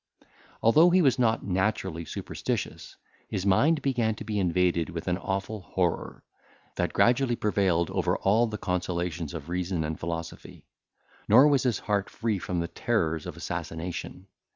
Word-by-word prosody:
Although 155 Hz, +10 st, +6 dB
he 180 Hz, 0 st, +4 dB
was 135 Hz, -3 st, +3 dB
not 115 Hz, -2 st, +2 dB
naturally 95 Hz, -3 st, -1 dB
superstitious, -, -, -4 dB, 0.3 s
his 95 Hz, -, -3 dB
mind 145 Hz, +11 st, +3 dB
began 120 Hz, -5 st, +1 dB
to -, -, -8 dB
be 105 Hz, -2 st, -2 dB
invaded 90 Hz, -1 st, +1 dB
with 85 Hz, 0 st, -6 dB
an 90 Hz, +1 st, 0 dB
awful 95 Hz, +2 st, -3 dB
horror, 90 Hz, -, -2 dB, 0.5 s
that -, -, -1 dB
gradually 125 Hz, 0 st, +3 dB
prevailed 95 Hz, -6 st, +1 dB
over -, -, 0 dB
all 110 Hz, +5 st, +3 dB
the 105 Hz, -1 st, -5 dB
consolations 90 Hz, -3 st, -3 dB
of 75 Hz, -2 st, -7 dB
reason 90 Hz, -1 st, -2 dB
and 80 Hz, 0 st, -4 dB
philosophy; 85 Hz, 0 st, -6 dB, 0.6 s
nor 125 Hz, +7 st, +8 dB
was 140 Hz, -3 st, +3 dB
his 120 Hz, -5 st, +1 dB
heart 100 Hz, -1 st, -1 dB
free 110 Hz, -4 st, -2 dB
from 90 Hz, -1 st, -2 dB
the 85 Hz, -, -2 dB
terrors 80 Hz, -8 st, -1 dB
of -, -, -7 dB
assassination. 85 Hz, +2 st, -5 dB
95 Hz, 155 wpm, -27 LUFS, 85-115 Hz, 0.6 s, nor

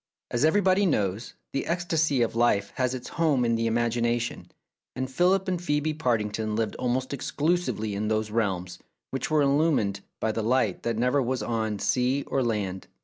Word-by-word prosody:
As 120 Hz, -, 0 dB
everybody 190 Hz, +4 st, +4 dB
knows, 105 Hz, -, -1 dB, 0.2 s
the 135 Hz, -, -2 dB
ecstasy 160 Hz, -6 st, +1 dB
of 115 Hz, -, -2 dB
life 115 Hz, -4 st, +2 dB
has 130 Hz, 0 st, +1 dB
its 125 Hz, -, -7 dB
home 150 Hz, -7 st, +1 dB
in 115 Hz, -, +2 dB
the 115 Hz, 0 st, 0 dB
imagination, 120 Hz, +1 st, 0 dB, 0.5 s
and 130 Hz, +1 st, -3 dB
Philip 185 Hz, +6 st, +2 dB
and 180 Hz, -2 st, 0 dB
Phcebe 155 Hz, -1 st, -1 dB
Partington 110 Hz, -5 st, 0 dB
lived 110 Hz, -1 st, -1 dB
almost 130 Hz, +2 st, -1 dB
exclusively 150 Hz, -7 st, -1 dB
in 105 Hz, +2 st, -2 dB
those 110 Hz, 0 st, 0 dB
realms 95 Hz, -5 st, -1 dB, 0.3 s
which 135 Hz, -1 st, -2 dB
were 155 Hz, -2 st, +3 dB
illumined 140 Hz, -8 st, +2 dB, 0.2 s
by 110 Hz, -, 0 dB
the 110 Hz, -, -2 dB
light 115 Hz, -3 st, +1 dB
that 115 Hz, -1 st, -2 dB
never 125 Hz, +4 st, +2 dB
was 125 Hz, -2 st, -1 dB
on 110 Hz, -2 st, -1 dB
sea 130 Hz, +6 st, +1 dB
or 135 Hz, -, -1 dB
land. 105 Hz, -6 st, -2 dB
120 Hz, 170 wpm, -27 LUFS, 110-145 Hz, 0.5 s, everybody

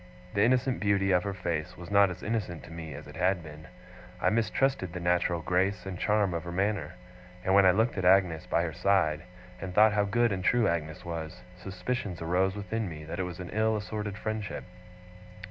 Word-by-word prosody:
The 100 Hz, -, +1 dB
innocent 125 Hz, +2 st, +2 dB
beauty 100 Hz, -1 st, +2 dB
of 90 Hz, -1 st, +4 dB
her 100 Hz, +2 st, -3 dB
face 85 Hz, -5 st, -3 dB
was 85 Hz, +2 st, -9 dB
not 100 Hz, -1 st, +6 dB
as 90 Hz, 0 st, -8 dB
innocent 105 Hz, -7 st, -3 dB
to -, -, -12 dB
me 80 Hz, -3 st, -7 dB
as -, -, -9 dB
it -, -, -12 dB
had 90 Hz, 0 st, +1 dB
been; 75 Hz, 0 st, -11 dB, 0.5 s
I 90 Hz, -, +2 dB
mistrusted 115 Hz, -3 st, 0 dB
the 90 Hz, -, -4 dB
natural 85 Hz, -1 st, +1 dB
grace 95 Hz, +3 st, 0 dB
and 95 Hz, -2 st, -5 dB
charm 105 Hz, -3 st, +2 dB
of 85 Hz, 0 st, -3 dB
her 85 Hz, -, -6 dB
manner; 100 Hz, +3 st, -1 dB, 0.5 s
and 95 Hz, -, +2 dB
when 100 Hz, -1 st, +7 dB
I -, -, +8 dB
looked 110 Hz, +2 st, +1 dB
at -, -, -2 dB
Agnes 90 Hz, -3 st, +3 dB
by 85 Hz, -, +1 dB
her 80 Hz, -2 st, -3 dB
side, 85 Hz, -4 st, +2 dB, 0.4 s
and 90 Hz, -1 st, -6 dB
thought 110 Hz, 0 st, +6 dB
how 105 Hz, -1 st, +2 dB
good 120 Hz, +3 st, +2 dB
and 95 Hz, -2 st, -2 dB
true 120 Hz, +2 st, +3 dB
Agnes 80 Hz, -2 st, -2 dB
was, 85 Hz, +1 st, -5 dB
suspicions 95 Hz, +1 st, -4 dB
arose 90 Hz, +4 st, +1 dB
within 105 Hz, +1 st, -3 dB
me 75 Hz, -2 st, -8 dB
that 80 Hz, +4 st, -6 dB
it -, -, +1 dB
was 85 Hz, -, -9 dB
an 90 Hz, -, -7 dB
ill 110 Hz, +1 st, +2 dB
assorted 105 Hz, -1 st, -4 dB
friendship. 110 Hz, -2 st, -4 dB
95 Hz, 210 wpm, -29 LUFS, 85-105 Hz, 0.5 s, I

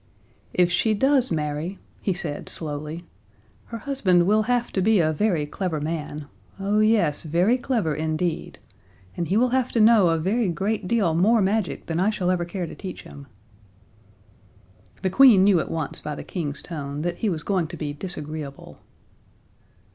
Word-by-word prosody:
"If 180 Hz, -1 st, +2 dB
she 215 Hz, +5 st, +2 dB
does 265 Hz, +1 st, +2 dB
marry," 155 Hz, +4 st, -2 dB, 0.2 s
he 195 Hz, -, 0 dB
said, 165 Hz, -5 st, -3 dB
slowly, 155 Hz, +2 st, -3 dB, 0.6 s
"her 230 Hz, -, -7 dB
husband 210 Hz, -9 st, +2 dB
will 215 Hz, +3 st, +3 dB
have 240 Hz, +2 st, 0 dB
to 190 Hz, -, 0 dB
be 215 Hz, +1 st, +4 dB
a 155 Hz, -2 st, +2 dB
very 170 Hz, -4 st, +1 dB
clever 160 Hz, +1 st, -3 dB
man 150 Hz, -1 st, -4 dB, 0.3 s
oh, 200 Hz, +2 st, +1 dB
yes, 215 Hz, -9 st, +2 dB
very 175 Hz, +9 st, +2 dB
clever 240 Hz, -, -1 dB
indeed! 155 Hz, +2 st, -2 dB, 0.6 s
And 170 Hz, -, -2 dB
he 195 Hz, -, +1 dB
will 250 Hz, +2 st, +3 dB
have 255 Hz, 0 st, 0 dB
to 230 Hz, -, +2 dB
know 215 Hz, -3 st, +6 dB
a 165 Hz, -, +2 dB
very 195 Hz, +6 st, 0 dB
great 195 Hz, +3 st, -2 dB
deal 195 Hz, -6 st, +2 dB
more 210 Hz, +8 st, +4 dB
magic 205 Hz, 0 st, 0 dB
than 165 Hz, 0 st, -2 dB
I 195 Hz, +3 st, +3 dB
shall 185 Hz, -4 st, 0 dB
ever 175 Hz, -1 st, 0 dB
care 175 Hz, +1 st, -4 dB
to -, -, -8 dB
teach 190 Hz, -2 st, -8 dB
him." 140 Hz, -1 st, -12 dB, 1.8 s
The 190 Hz, -, 0 dB
Queen 235 Hz, -4 st, +7 dB
knew 195 Hz, -3 st, +5 dB
at -, -, -3 dB
once 160 Hz, -3 st, -4 dB
by 150 Hz, -1 st, -5 dB
the -, -, -7 dB
King's 150 Hz, -5 st, -4 dB
tone 145 Hz, -3 st, -5 dB
that 175 Hz, 0 st, -2 dB
he 220 Hz, -, 0 dB
was 160 Hz, -5 st, -3 dB
going 185 Hz, -5 st, 0 dB
to -, -, -9 dB
be 145 Hz, -2 st, -4 dB
disagreeable. 150 Hz, -4 st, -7 dB
180 Hz, 175 wpm, -24 LUFS, 155-215 Hz, 1.8 s, Queen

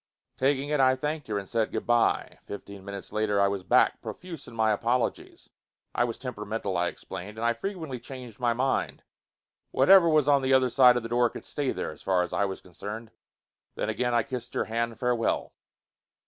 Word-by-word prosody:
Taking 140 Hz, +1 st, +1 dB
it, 150 Hz, -1 st, +1 dB
I 130 Hz, -1 st, +5 dB
thanked 150 Hz, +1 st, -3 dB
her 105 Hz, -2 st, -1 dB
and 100 Hz, -1 st, -5 dB
said 115 Hz, 0 st, 0 dB
good -, -, -3 dB
bye. 120 Hz, -1 st, +1 dB
Fifteen 100 Hz, -1 st, -8 dB
minutes 100 Hz, 0 st, -8 dB
later 105 Hz, -1 st, +1 dB
I 100 Hz, -, +5 dB
was 100 Hz, -1 st, -2 dB
back, 90 Hz, -, +3 dB
profuse 170 Hz, -6 st, -8 dB
in -, -, -11 dB
my 110 Hz, -1 st, +3 dB
apologies: 120 Hz, +4 st, -1 dB, 0.4 s
I 120 Hz, -, +2 dB
was 115 Hz, -2 st, -4 dB
temperamental, 105 Hz, -5 st, -4 dB
I 90 Hz, 0 st, +1 dB
explained, 95 Hz, +4 st, -7 dB
and 115 Hz, -, -2 dB
I 120 Hz, -, +3 dB
frequently 160 Hz, -, -5 dB
changed 125 Hz, -4 st, -10 dB
my 120 Hz, -1 st, +2 dB
mind. 130 Hz, +3 st, -1 dB, 0.7 s
Whatever 185 Hz, -3 st, +6 dB
was 155 Hz, -3 st, +3 dB
on 140 Hz, -1 st, +5 dB
the 135 Hz, 0 st, +2 dB
other 130 Hz, -1 st, +3 dB
side 125 Hz, -2 st, +6 dB
of 120 Hz, -, -2 dB
the 115 Hz, -, -5 dB
door 120 Hz, 0 st, +3 dB
could -, -, -10 dB
stay 145 Hz, -3 st, -2 dB
there, -, -, -3 dB
as 75 Hz, -, -13 dB
far 90 Hz, -2 st, +2 dB
as 90 Hz, -, -6 dB
I 100 Hz, -, +2 dB
was 95 Hz, -1 st, -5 dB
concerned. 105 Hz, +5 st, -8 dB, 0.6 s
Then -, -, -2 dB
again 125 Hz, -1 st, 0 dB
I 115 Hz, -, +3 dB
kissed 125 Hz, -3 st, -6 dB
her -, -, 0 dB
hand 115 Hz, 0 st, -2 dB
farewell. 125 Hz, -2 st, 0 dB
120 Hz, 205 wpm, -27 LUFS, 105-130 Hz, 0.7 s, Whatever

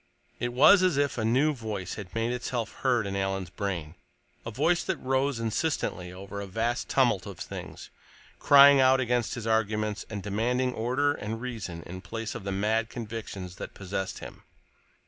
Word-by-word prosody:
_ -, -, -36 dB
It 120 Hz, +1 st, -1 dB
was 155 Hz, +11 st, +7 dB
as 180 Hz, -6 st, +2 dB
if 140 Hz, -4 st, +1 dB
a -, -, 0 dB
new 130 Hz, +7 st, +3 dB
voice 105 Hz, -7 st, -5 dB
had 95 Hz, -2 st, -8 dB
made 115 Hz, +2 st, 0 dB
itself 120 Hz, -1 st, -3 dB
heard 125 Hz, -5 st, +1 dB
in 100 Hz, 0 st, -3 dB
Alan's 95 Hz, -2 st, -2 dB
brain, 90 Hz, -6 st, -4 dB, 0.5 s
a -, -, -5 dB
voice 165 Hz, +10 st, +1 dB
that -, -, -2 dB
rose 135 Hz, 0 st, 0 dB
insistently 110 Hz, -, -2 dB
over 100 Hz, +2 st, -7 dB
a 100 Hz, -, -6 dB
vast 115 Hz, +5 st, -2 dB
tumult 120 Hz, -8 st, +2 dB
of 100 Hz, -4 st, -8 dB
things, -, -, -8 dB, 0.5 s
crying 140 Hz, 0 st, +8 dB
out 130 Hz, 0 st, +5 dB
against 120 Hz, -2 st, 0 dB
his 120 Hz, -3 st, -6 dB
arguments 110 Hz, -1 st, 0 dB
and 105 Hz, -3 st, -5 dB
demanding 125 Hz, +5 st, 0 dB
order 130 Hz, +6 st, +1 dB
and 110 Hz, -3 st, -5 dB
reason 110 Hz, -9 st, -6 dB
in 95 Hz, +2 st, -8 dB
place 115 Hz, +2 st, -5 dB
of 95 Hz, -, -7 dB
the 100 Hz, -, -2 dB
mad 110 Hz, +3 st, 0 dB
convictions 105 Hz, -6 st, -6 dB
that -, -, -8 dB
possessed 95 Hz, 0 st, -4 dB
him. -, -, -10 dB
115 Hz, 180 wpm, -28 LUFS, 100-130 Hz, 0.5 s, crying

